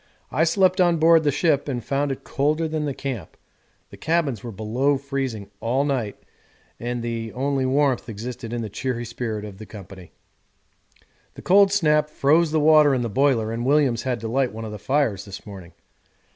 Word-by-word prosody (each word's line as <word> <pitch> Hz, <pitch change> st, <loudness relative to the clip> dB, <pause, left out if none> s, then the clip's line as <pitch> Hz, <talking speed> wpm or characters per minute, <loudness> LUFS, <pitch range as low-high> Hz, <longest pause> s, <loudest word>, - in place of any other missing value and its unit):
I 160 Hz, -, +2 dB
slept 185 Hz, +2 st, +3 dB
on 175 Hz, -2 st, +3 dB
board 165 Hz, 0 st, +5 dB
the 145 Hz, -, +2 dB
ship 145 Hz, -1 st, +1 dB
and 125 Hz, -4 st, -3 dB
found 140 Hz, +1 st, 0 dB
it 135 Hz, -, -6 dB
colder 155 Hz, +4 st, 0 dB
than 155 Hz, -1 st, -2 dB
the 140 Hz, -, -2 dB
camp 125 Hz, -, -6 dB, 0.5 s
the -, -, -11 dB
cabins 155 Hz, -, -1 dB
were 120 Hz, -, -6 dB
below 120 Hz, +7 st, 0 dB
freezing 135 Hz, -7 st, -4 dB
all 130 Hz, +5 st, 0 dB
night 125 Hz, -8 st, -2 dB, 0.6 s
and 120 Hz, 0 st, -3 dB
the 115 Hz, -1 st, -4 dB
only 135 Hz, 0 st, -1 dB
warmth 135 Hz, -2 st, +1 dB
existed 115 Hz, +2 st, -6 dB
in 120 Hz, -1 st, -3 dB
the -, -, -4 dB
cheery 120 Hz, +3 st, -3 dB
spirit 110 Hz, -2 st, -4 dB
of 100 Hz, -2 st, -10 dB
the 110 Hz, -, -10 dB
company. 95 Hz, -3 st, -11 dB, 1.2 s
The -, -, -11 dB
cold 195 Hz, +1 st, +5 dB
snap 150 Hz, -6 st, +2 dB
froze 155 Hz, +3 st, +3 dB
the 155 Hz, +1 st, +1 dB
water 150 Hz, -2 st, +5 dB
in 125 Hz, -, -1 dB
the 120 Hz, -, -2 dB
boiler 120 Hz, -2 st, +1 dB
and 115 Hz, +1 st, -3 dB
Williams 135 Hz, -4 st, +2 dB
had 125 Hz, -2 st, -2 dB
to 115 Hz, -, -4 dB
light 130 Hz, +2 st, 0 dB
one 110 Hz, +1 st, -7 dB
of 110 Hz, -, -6 dB
the 105 Hz, -, -7 dB
fires 115 Hz, -5 st, 0 dB
this 100 Hz, -2 st, -9 dB
morning. 95 Hz, -4 st, -10 dB
130 Hz, 190 wpm, -23 LUFS, 115-150 Hz, 1.2 s, board